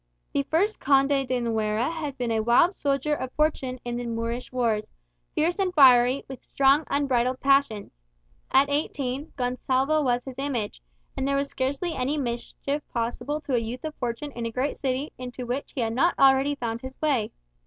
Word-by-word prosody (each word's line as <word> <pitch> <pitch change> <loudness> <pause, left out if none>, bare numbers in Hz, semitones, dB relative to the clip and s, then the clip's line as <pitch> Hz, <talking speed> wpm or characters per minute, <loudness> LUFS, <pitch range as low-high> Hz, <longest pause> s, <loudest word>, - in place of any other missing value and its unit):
The 280 - +2
first 400 +7 +1
Conde 275 -1 +3
de 255 -1 0
Nuera 220 +2 0
had 300 -5 -5
been 245 -2 -2
a 225 - +1
wild 240 - +4
soldier 280 -2 0
of 260 -3 -3
fortune 270 -4 0
in 240 0 -3
the 245 0 -4
Moorish 230 +1 -3
wars, 230 -4 0 0.5
fierce 345 +5 +1
and 380 -2 +1
fiery, 255 -2 +6
with 265 -1 -9
strong 275 +2 +3
unbridled 255 -3 +1
passions. 275 -7 +2 0.6
At 275 +1 +5
eighteen, 280 -1 -2
Gonsalvo 260 +4 +1
was 245 -2 +1
his 265 -1 -8
image; 250 - -3 0.3
and 265 - -1
there 275 - +1
was 280 0 0
scarcely 280 +6 -2
any 270 +3 -1
mischief 275 +3 -3
possible 240 +5 -2
to 280 - -4
a 245 - +4
youth 230 +3 -5
of 310 -1 -4
fortune 245 +3 -4
in 235 -3 -4
a - - -5
great 255 +5 -1
city, 265 +2 -2
into 250 0 -6
which 250 +4 -4
he 260 - -1
had 225 -1 -1
not 335 +9 +2
already 270 +1 +4
found 235 -3 -4
his 260 0 -9
way. 275 -9 +1
265 Hz, 185 wpm, -26 LUFS, 240-285 Hz, 0.6 s, fiery